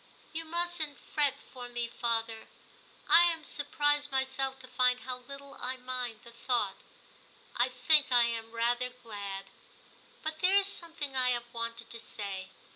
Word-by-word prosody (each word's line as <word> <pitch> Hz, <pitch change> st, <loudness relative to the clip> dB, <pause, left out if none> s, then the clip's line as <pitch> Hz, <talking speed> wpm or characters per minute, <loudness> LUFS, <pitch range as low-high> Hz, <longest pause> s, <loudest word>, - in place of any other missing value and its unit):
*You 325 Hz, +1 st, -3 dB
mustn't 340 Hz, -3 st, -1 dB
fret 290 Hz, -3 st, 0 dB
for 245 Hz, -2 st, -10 dB
me, 240 Hz, 0 st, -2 dB
father; 230 Hz, -1 st, -1 dB, 0.6 s
I 345 Hz, +1 st, +9 dB
am 330 Hz, -2 st, +1 dB
surprised 290 Hz, 0 st, +1 dB
myself 265 Hz, 0 st, 0 dB
to 255 Hz, -, -10 dB
find 250 Hz, -1 st, +3 dB
how 255 Hz, -1 st, -4 dB
little 275 Hz, +2 st, -10 dB
I 255 Hz, +1 st, -1 dB
mind 250 Hz, -3 st, -2 dB
the 235 Hz, -, -12 dB
thought; 235 Hz, -4 st, 0 dB, 0.8 s
I 240 Hz, +2 st, +3 dB
think 260 Hz, +3 st, +3 dB
I 245 Hz, -1 st, +7 dB
am 230 Hz, -1 st, -2 dB
rather 240 Hz, +2 st, +1 dB
glad. 200 Hz, -5 st, -7 dB, 0.7 s
But 315 Hz, 0 st, -3 dB
there 370 Hz, +3 st, +4 dB
is 400 Hz, -, +4 dB
something 330 Hz, -7 st, -3 dB
I 255 Hz, -1 st, +4 dB
have 240 Hz, -1 st, -2 dB
wanted 230 Hz, 0 st, -4 dB
to 230 Hz, -, -6 dB
say. 195 Hz, -4 st, -6 dB
250 Hz, 155 wpm, -31 LUFS, 235-290 Hz, 0.8 s, I